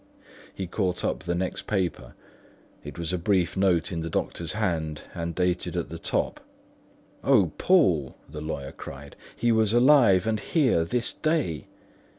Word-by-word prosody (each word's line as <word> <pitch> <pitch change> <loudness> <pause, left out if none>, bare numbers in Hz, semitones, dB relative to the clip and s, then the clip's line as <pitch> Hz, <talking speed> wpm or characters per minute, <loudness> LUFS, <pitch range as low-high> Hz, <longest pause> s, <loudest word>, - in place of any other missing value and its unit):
He 95 - -5
caught 90 0 -1
up - - -1
the 85 0 -2
next 90 +1 -3
paper; 95 -5 -2 0.7
it - - -9
was 85 +1 -3
a 90 - 0
brief 90 -1 +1
note 95 -2 +2
in 85 -2 -3
the 80 - -4
doctor's 85 +1 -2
hand 80 -8 -2
and 85 -1 -4
dated 90 -1 0
at - - -2
the - - -7
top. - - -1 0.8
"O 105 - +4
Poole!" 90 - +3
the 75 0 -8
lawyer 70 -3 -5
cried, 70 +1 -10 0.2
"he 120 +1 +1
was 110 -1 +3
alive 120 -7 +5
and 110 -1 0
here 130 - +2
this 120 +8 -1
day. 155 - -1
90 Hz, 160 wpm, -26 LUFS, 85-110 Hz, 0.8 s, alive